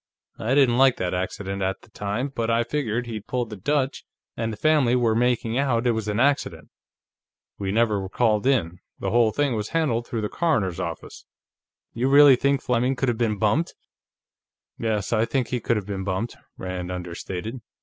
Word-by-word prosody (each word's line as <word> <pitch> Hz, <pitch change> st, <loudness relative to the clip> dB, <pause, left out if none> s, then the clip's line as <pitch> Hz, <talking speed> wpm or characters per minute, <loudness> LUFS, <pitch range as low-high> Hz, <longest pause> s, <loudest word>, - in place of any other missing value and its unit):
I 120 Hz, +5 st, 0 dB
didn't 130 Hz, -4 st, +4 dB
like 135 Hz, -2 st, +5 dB
that 90 Hz, -1 st, -2 dB
accident, 95 Hz, +2 st, -3 dB
at 95 Hz, 0 st, -1 dB
the -, -, -20 dB
time, 105 Hz, +7 st, -3 dB
but 115 Hz, -1 st, -1 dB
I 115 Hz, +1 st, +3 dB
figured 125 Hz, -2 st, -2 dB
he'd 110 Hz, -3 st, -7 dB
pulled 120 Hz, -3 st, -2 dB
the -, -, -5 dB
Dutch, 140 Hz, +6 st, -1 dB, 0.3 s
and 115 Hz, 0 st, -2 dB
the 110 Hz, -, -7 dB
family 145 Hz, -2 st, +3 dB
were 120 Hz, -3 st, +2 dB
making 120 Hz, 0 st, +1 dB
out 125 Hz, -4 st, +1 dB
it 120 Hz, -, +4 dB
was 110 Hz, -2 st, -3 dB
an 105 Hz, +1 st, -1 dB
accident. 120 Hz, -, 0 dB, 0.9 s
We 95 Hz, -1 st, -2 dB
never 110 Hz, -1 st, +2 dB
were 95 Hz, -, -6 dB
called 110 Hz, +1 st, +1 dB
in; 90 Hz, -11 st, +1 dB, 0.2 s
the -, -, -3 dB
whole 115 Hz, -1 st, +4 dB
thing 140 Hz, 0 st, 0 dB
was 105 Hz, -1 st, -3 dB
handled 130 Hz, -8 st, 0 dB
through 115 Hz, -, -3 dB
the 105 Hz, -, -1 dB
coroner's 105 Hz, -, 0 dB
office. 85 Hz, -3 st, -6 dB, 0.7 s
You 125 Hz, +3 st, 0 dB
really 140 Hz, -1 st, +8 dB
think 140 Hz, +2 st, +1 dB
Fleming 125 Hz, +2 st, +1 dB
could 130 Hz, 0 st, 0 dB
have 120 Hz, -, -1 dB
been 110 Hz, -3 st, +1 dB
bumped?" 110 Hz, -, +1 dB, 1.0 s
"Yes. 110 Hz, -2 st, -1 dB
I 110 Hz, -1 st, +3 dB
think 125 Hz, +1 st, -1 dB
he 125 Hz, -, -1 dB
could 115 Hz, -1 st, 0 dB
have 105 Hz, -, -4 dB
been 100 Hz, -1 st, -4 dB
bumped," 100 Hz, +4 st, -2 dB, 0.2 s
Rand 90 Hz, -1 st, -5 dB
understated. 90 Hz, +6 st, -5 dB
115 Hz, 190 wpm, -24 LUFS, 100-125 Hz, 1.0 s, really